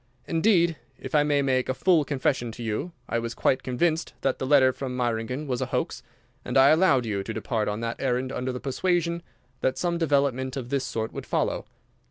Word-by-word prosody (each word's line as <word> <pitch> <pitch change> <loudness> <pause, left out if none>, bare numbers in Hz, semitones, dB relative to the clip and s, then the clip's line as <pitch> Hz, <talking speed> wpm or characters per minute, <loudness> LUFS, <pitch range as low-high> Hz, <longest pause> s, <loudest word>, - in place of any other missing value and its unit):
Indeed, 170 -2 +3 0.2
if 130 - -8
I 150 - +5
may 145 -1 +2
make 130 -2 +1
a 130 - 0
full 175 -2 +3
confession 130 -4 0
to 120 - -7
you, 110 +10 -2 0.2
I 115 - 0
was 115 0 -4
quite 130 - +2
convinced 160 +7 0
that 135 - 0
the 130 - -2
letter 130 -2 +5
from 125 -1 -5
Meiringen 120 +3 -1
was 125 -4 -2
a - - -1
hoax, - - -2 0.4
and - - -1
I 135 +1 +7
allowed 155 -6 +4
you 100 -3 -1
to 110 +3 -5
depart 110 0 -1
on 105 +2 -2
that 115 0 -4
errand 130 0 0
under 130 0 -2
the 125 - -5
persuasion 170 +4 0 0.4
that 130 - 0
some 175 -1 -1
development 140 -4 +1
of 125 -2 -5
this 140 -1 0
sort 110 0 -3
would - - -7
follow. - - -1
130 Hz, 210 wpm, -26 LUFS, 125-150 Hz, 0.4 s, I